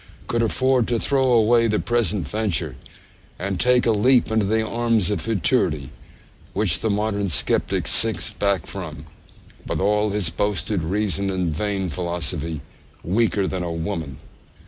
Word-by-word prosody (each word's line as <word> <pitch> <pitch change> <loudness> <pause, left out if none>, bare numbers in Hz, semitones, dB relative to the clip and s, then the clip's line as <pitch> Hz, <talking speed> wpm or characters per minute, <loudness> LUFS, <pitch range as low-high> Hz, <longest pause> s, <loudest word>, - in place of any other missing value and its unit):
could 115 - 0
afford 130 +1 +2
to 120 - +1
throw 135 0 +1
away 115 0 +4
the 105 -1 +1
present 105 -8 0
venture, 90 - -1 0.6
and 95 -1 -3
take 125 0 +3
a 115 - +4
leap 120 +3 +3
into 110 -1 +2
the 110 +2 +1
arms 115 -5 +1
of 100 -5 -1
futurity, 75 - 0 0.6
which 95 -5 +2
the 110 - -1
modern 100 -1 0
sceptic 80 - +1
shrinks - - 0
back 100 -2 0
from, 90 -6 -7 0.6
with - - -2
all 105 +2 +2
his 100 -5 0
boasted 100 +1 -1
reason 100 +1 -1
and 90 -5 -1
vain 100 +1 -1
philosophy, 85 -2 -3 0.4
weaker 100 +1 +1
than 95 -1 -3
a 85 -1 -3
woman! 80 -5 -4
100 Hz, 145 wpm, -22 LUFS, 85-110 Hz, 0.6 s, away